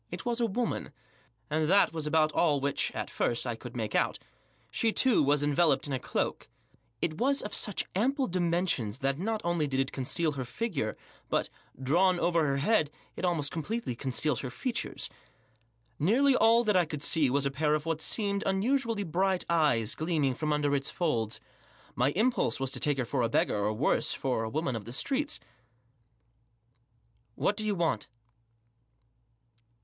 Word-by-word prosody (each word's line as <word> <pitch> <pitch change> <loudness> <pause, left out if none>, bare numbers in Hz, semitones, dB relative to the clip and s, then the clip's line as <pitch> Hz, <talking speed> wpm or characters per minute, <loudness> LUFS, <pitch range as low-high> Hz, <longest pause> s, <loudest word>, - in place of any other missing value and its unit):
It - - -7
was 240 -1 0
a 230 - +3
woman, 230 -6 -2 0.6
and 155 +2 0
that 200 -3 +4
was 160 -2 -3
about 155 0 +3
all 150 -2 +2
which, 140 +1 0
at - - -3
first, 120 +1 -1
I 120 -2 -2
could 120 +1 -10
make 110 -3 -3
out. - - +1 0.5
She, 225 - +1
too, 255 +1 +3
was 145 +1 +2
enveloped 145 -1 +3
in 145 - -2
a 130 - -1
cloak. - - -3 0.5
It 155 -1 -1
was 275 +3 +2
of 210 - -6
such 210 - 0
ample 265 +8 +1
dimensions 170 - 0
that 135 +2 0
not 215 +3 -1
only 170 -3 0
did 135 -1 -1
it 135 - 0
conceal 155 +5 -1
her 135 -3 -4
figure, 135 - -3 0.3
but, - - 0 0.3
drawn 175 +7 +3
over 170 -3 +2
her 140 0 0
head, 155 +1 +2 0.3
it - - -7
almost 165 -5 +1
completely 165 - -3
concealed 135 +2 -1
her 130 - -4
features. 235 - -3 0.9
Nearly 255 - +4
all 230 0 +5
that 210 -3 +1
I 180 -2 +4
could 150 -2 -5
see 155 -5 +3
was 140 +2 +1
a 140 - 0
pair 150 +2 +1
of 155 0 -3
what 165 -1 -2
seemed 200 0 0
unusually 225 +2 +1
bright 190 +2 0
eyes, 145 -9 +3
gleaming 155 -5 0
from 155 +4 -2
under 145 -1 +1
its 140 0 0
folds. 115 - -1 0.5
My 125 +2 +2
impulse 240 - +1
was 135 -1 -1
to - - -2
take 145 -2 0
her 130 - -1
for 125 +2 -1
a 115 - +1
beggar, - - +1
or 105 - +1
worse, 115 +7 +1
for 130 -4 -1
a 110 - -3
woman 140 -1 -1
of 110 -3 -5
the 120 - -6
streets. 285 - -1 1.0
" 115 -1 -43 0.7
What 205 - +1
do 215 - -2
you 210 -1 0
want 165 - 0
155 Hz, 180 wpm, -29 LUFS, 135-195 Hz, 1.0 s, all